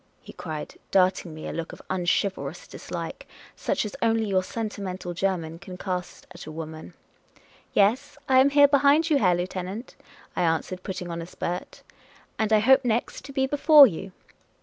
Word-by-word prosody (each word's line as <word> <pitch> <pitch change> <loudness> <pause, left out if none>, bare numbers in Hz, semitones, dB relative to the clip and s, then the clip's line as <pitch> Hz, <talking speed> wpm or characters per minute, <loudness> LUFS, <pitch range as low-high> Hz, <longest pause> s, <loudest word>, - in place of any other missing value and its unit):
he - - -12
cried, 155 -3 -7
darting 185 -2 +2
me 155 0 -8
a - - -5
look 165 -1 -5
of - - -11
unchivalrous 190 - -1
dislike, - - -7 0.3
such - - -1
as 210 - -6
only 225 -1 +2
your 190 -2 +1
sentimental 190 -4 -5
German 170 -3 -2
can 180 0 -9
cast 180 -1 -5
at 180 -3 -11
a - - -6
woman. 155 - -8 0.4
" - - -27 0.3
Yes, 255 +9 +2
I 260 -1 +5
am 270 +2 +6
here, 285 0 +6
behind 285 +3 +4
you, 290 - +4
Herr 180 -6 +3
Lieutenant," 185 +5 -5 0.4
I - - 0
an 165 -2 +2
swered, 185 -1 -8
putting 180 -2 -5
on 170 0 -4
a 165 - -7
spurt; 175 0 -5 0.3
" - - -29
and 220 0 0
I 215 - +6
hope 265 +5 +5
next 235 +1 -1
to 280 - -9
be 265 -1 +1
before 290 +1 +7
you." 190 -3 -3
190 Hz, 185 wpm, -25 LUFS, 175-260 Hz, 0.4 s, before